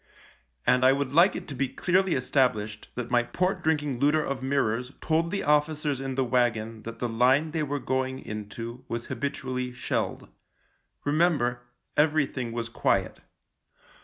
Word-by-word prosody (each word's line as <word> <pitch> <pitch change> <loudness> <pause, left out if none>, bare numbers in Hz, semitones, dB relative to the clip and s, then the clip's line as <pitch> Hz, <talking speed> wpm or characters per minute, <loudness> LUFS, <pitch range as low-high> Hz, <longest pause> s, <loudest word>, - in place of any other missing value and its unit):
And 125 0 +4
I 130 +1 +7
would 140 -1 -2
like 175 +5 +6
it - - -6
to - - -5
be 135 +1 0
clearly 180 +7 +1
established 110 -5 0
that 125 -1 -4
my 120 -1 +5
port 180 +8 -1
drinking 150 -5 0
looter 150 +2 +3
of 135 -1 -3
mirrors 130 -2 0
told 165 +1 +1
the 200 +2 -2
officers 150 -1 +1
in 135 -1 -3
the 135 - +2
wagon 115 -3 0
that 115 0 -6
the 120 - -1
line 130 +7 +3
they 160 0 -1
were 145 -1 -1
going 130 -1 -1
into 115 +2 -7
was 115 0 -4
habitually 125 -1 -3
shelled. 125 - -2 0.8
Remember, 145 -6 +2 0.3
everything 145 -5 +1
was 115 0 -3
quiet. 115 - 0
130 Hz, 155 wpm, -27 LUFS, 120-150 Hz, 0.8 s, I